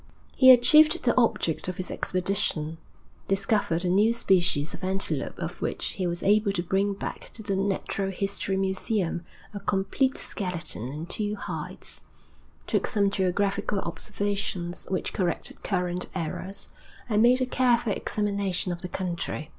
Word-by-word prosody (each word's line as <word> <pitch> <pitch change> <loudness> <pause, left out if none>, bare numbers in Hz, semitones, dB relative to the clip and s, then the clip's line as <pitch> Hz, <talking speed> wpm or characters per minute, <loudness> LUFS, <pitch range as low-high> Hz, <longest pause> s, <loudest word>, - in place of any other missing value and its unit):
He 260 - +7
achieved 260 +5 +7
the 240 - +3
object 220 -11 +1
of 185 0 -4
his 185 - -3
expedition, 180 -4 0 0.5
discovered 195 -3 +1
a - - +1
new 205 +6 +4
species 175 -9 +2
of - - -9
antelope 185 -6 -2
of 175 +1 -5
which - - -2
he 185 -2 -2
was 175 0 -2
able 210 +1 +4
to 175 - -1
bring 195 +3 +1
back - - -6
to 220 - -8
the 200 -2 -1
Natural 195 0 -1
History 195 0 -2
Museum 190 -2 -1 0.3
a 205 - -4
complete 200 +7 0
skeleton 175 - -3
and 155 +4 -6
two 210 +2 -1
hides; - - -3 0.6
took - - 0
some 200 -3 +1
geographical 200 +1 0
observations 195 -1 -3
which 185 -1 -2
corrected 180 -3 -2
current 180 -2 -1
errors, 185 +3 -2 0.3
and 215 -2 +2
made 245 +2 +6
a 255 - +2
careful 245 -4 +2
examination 200 -4 -1
of 175 0 -5
the 180 - -5
country. 170 -4 -3
195 Hz, 145 wpm, -27 LUFS, 180-210 Hz, 0.6 s, He